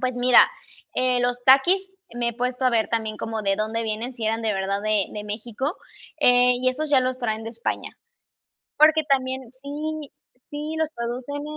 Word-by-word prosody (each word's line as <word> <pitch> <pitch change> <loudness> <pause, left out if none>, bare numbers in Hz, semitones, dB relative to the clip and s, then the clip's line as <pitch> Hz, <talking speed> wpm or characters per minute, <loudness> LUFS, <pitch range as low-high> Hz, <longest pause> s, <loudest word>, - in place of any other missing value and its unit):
Pues 255 -1 -1
mira, 245 0 +6 0.5
eh, 255 -1 +2
los 245 0 -1
Takis 355 +9 +5 0.2
me 240 0 -1
he 235 - -3
puesto 250 +1 -2
a 255 - +4
ver 225 -2 +1
también 220 -2 -2
como 220 0 -4
de 195 -1 +1
dónde 220 +2 -1
vienen, 225 +3 -3
si 235 -3 -6
eran 225 +1 0
de 220 -1 0
verdad 195 +1 -1
de 215 -2 +1
de 210 0 -6
México, 235 - -4 0.4
eh, 250 -1 +6
y 255 +1 +2
esos 300 +5 -2
ya 275 -3 +5
los 255 0 -1
traen 220 -3 -2
de 225 - -5
España. 230 +1 -4 0.9
Porque 310 +1 +6
también 260 -1 0
sí 290 +3 -6 0.4
sí 295 0 -5 0.2
los 320 -1 +1
producen 245 +5 -4
245 Hz, 185 wpm, -24 LUFS, 225-265 Hz, 0.9 s, mira